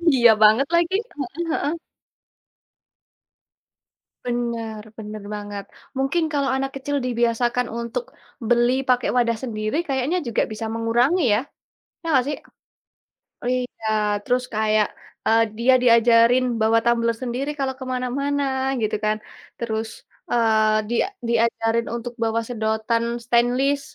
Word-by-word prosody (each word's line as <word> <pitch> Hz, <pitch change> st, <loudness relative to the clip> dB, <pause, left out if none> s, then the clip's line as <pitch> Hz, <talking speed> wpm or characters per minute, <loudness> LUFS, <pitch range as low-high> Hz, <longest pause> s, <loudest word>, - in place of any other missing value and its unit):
Iya 235 Hz, -2 st, +7 dB
banget 220 Hz, +6 st, +6 dB
lagi, 345 Hz, +2 st, +2 dB, 0.2 s
heeh 285 Hz, +5 st, -4 dB
heeh. 295 Hz, +1 st, 0 dB, 2.5 s
Bener 235 Hz, -3 st, -3 dB, 0.2 s
bener 210 Hz, -1 st, -7 dB
banget. 205 Hz, -1 st, -6 dB, 0.3 s
Mungkin 275 Hz, +6 st, +1 dB
kalau 280 Hz, -2 st, +1 dB
anak 270 Hz, 0 st, -2 dB
kecil 285 Hz, +1 st, -2 dB
dibiasakan 240 Hz, 0 st, +1 dB
untuk, 235 Hz, +1 st, -3 dB, 0.4 s
beli 240 Hz, +1 st, +3 dB, 0.2 s
pakai 250 Hz, -1 st, +3 dB
wadah 235 Hz, -2 st, +2 dB
sendiri 215 Hz, +2 st, -2 dB
kayaknya 275 Hz, +6 st, 0 dB
juga 230 Hz, -, +1 dB
bisa 220 Hz, +1 st, -4 dB
mengurangi 235 Hz, +9 st, +1 dB
ya, 210 Hz, -, +3 dB, 0.6 s
iya 330 Hz, -, -9 dB
nggak 260 Hz, -3 st, +4 dB
sih? 295 Hz, -, -1 dB, 1.1 s
Iya, 250 Hz, -3 st, -3 dB, 0.4 s
terus 250 Hz, 0 st, +1 dB
kayak, 215 Hz, -1 st, +2 dB, 0.4 s
eee, 225 Hz, +1 st, +4 dB, 0.2 s
dia 255 Hz, +3 st, +4 dB
diajarin 235 Hz, +1 st, +5 dB, 0.2 s
bawa 225 Hz, +1 st, +4 dB
tumbler 235 Hz, -1 st, +2 dB
sendiri 255 Hz, +4 st, -2 dB
kalau 265 Hz, -1 st, 0 dB
ke 260 Hz, -, -6 dB
mana-mana 280 Hz, +3 st, -1 dB, 0.4 s
gitu 215 Hz, 0 st, 0 dB
kan, 215 Hz, 0 st, +1 dB, 0.4 s
terus, 220 Hz, -1 st, -2 dB, 0.4 s
eee, 220 Hz, -2 st, +3 dB
dia 240 Hz, -, +2 dB, 0.3 s
diajarin 230 Hz, 0 st, +1 dB
untuk 240 Hz, +1 st, -5 dB
bawa 225 Hz, 0 st, +1 dB
sedotan 220 Hz, 0 st, -1 dB, 0.2 s
stainless 250 Hz, +4 st, +2 dB
235 Hz, 120 wpm, -22 LUFS, 225-260 Hz, 2.5 s, Iya